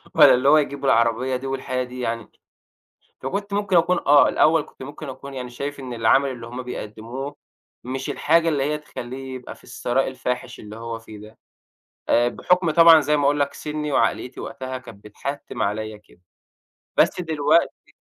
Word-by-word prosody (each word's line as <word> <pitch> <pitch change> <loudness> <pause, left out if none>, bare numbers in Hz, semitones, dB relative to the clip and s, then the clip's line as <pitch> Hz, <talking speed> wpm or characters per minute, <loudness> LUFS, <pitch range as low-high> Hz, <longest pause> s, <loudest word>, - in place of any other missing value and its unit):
والّا - - +8
اللي 130 +3 +3
هو 155 - +7
يجيب 140 -2 -1
العربية 115 +2 +2
دي 135 +2 -4
والحياة 130 -1 -2
دي 125 0 -9
يعني؟ 115 -2 -3 0.9
فكنت 200 +9 -4
ممكن 200 -3 +2
أكون 175 +2 +3
آه، 145 0 +7
الأول 160 0 +4
كنت - - -13
ممكن 145 +2 -8
أكون 140 +1 -9
يعني 125 -2 -6
شايف 140 +4 -5
إن 130 -2 -6
العمل 120 +4 +3
اللي 115 -2 -8
هم 125 +2 -6
بيقدّموه 125 +4 -6 0.5
مش 130 +2 -4
الحاجة 165 +2 +2
اللي 145 -3 0
هي 150 +2 0
تخلّيه 130 -2 -8
يبقى 125 - -9
في - - -22
الثراء 130 +2 -1
الفاحِش 125 -1 -4
اللي 105 0 -10
هو 115 0 -6
فيه 110 -1 -12
ده، 105 +2 -13 0.7
آآ 120 +1 +4
بحُكم 180 +7 +1
طبعًا 165 0 +8
زي 150 +1 +1
ما 145 - 0
أقول 145 +1 +2
لك 140 0 0
سِنّي 150 -1 -4
وعقليّتي 125 - 0
وقتها 130 0 -6
كانت 115 -5 -14
بتحتّم 140 +7 -5
عليّا 110 +1 -2
كده، 105 -4 -23 0.8
بس - - +3
دلوقتي 160 0 +1
130 Hz, 175 wpm, -23 LUFS, 120-145 Hz, 0.9 s, والّا